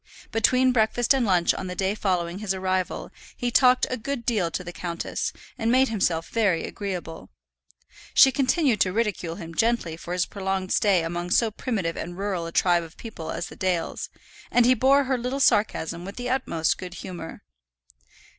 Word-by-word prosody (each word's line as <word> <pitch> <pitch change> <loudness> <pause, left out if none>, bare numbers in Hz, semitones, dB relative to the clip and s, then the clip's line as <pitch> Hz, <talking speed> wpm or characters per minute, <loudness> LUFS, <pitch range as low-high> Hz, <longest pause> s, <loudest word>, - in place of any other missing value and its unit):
Between 255 +3 +3
breakfast 240 +1 +2
and 260 -4 +1
lunch 180 -3 +3
on 185 - -5
the 180 - -5
day 190 +1 0
following 180 -3 -1
his 200 -3 -2
arrival 185 -1 -2 0.3
he 245 0 -1
talked 250 0 +5
a 255 - -1
good 240 +1 -4
deal 210 -8 +1
to 180 - -4
the 175 0 -8
countess, 170 -1 -3 0.3
and 225 +1 +1
made 260 +1 +4
himself 175 -6 0
very 200 -8 +1
agreeable. 180 -5 -6 0.9
She 265 - +8
continued 265 - +2
to 185 - +3
ridicule 200 -6 -1
him 165 -3 -8
gently 225 -5 0
for 170 +1 -6
his 180 0 +1
prolonged 190 -1 -2
stay 195 -5 +3
among 175 +1 -3
so 225 +4 +3
primitive 200 -7 -3
and 175 +1 -6
rural 190 -4 -2
a - - -7
tribe 175 0 +3
of 165 -1 -11
people 210 -8 -8
as - - -3
the - - -11
Dales, 180 -3 -2 0.4
and 245 -1 +4
he 255 - +6
bore 270 +3 +4
her 260 -1 -1
little 250 +3 -2
sarcasm 175 - +1
with 195 +2 -8
the 245 0 -3
utmost 165 -12 0
good 180 -1 -7
humour. 175 -4 -8
195 Hz, 185 wpm, -25 LUFS, 175-240 Hz, 0.9 s, She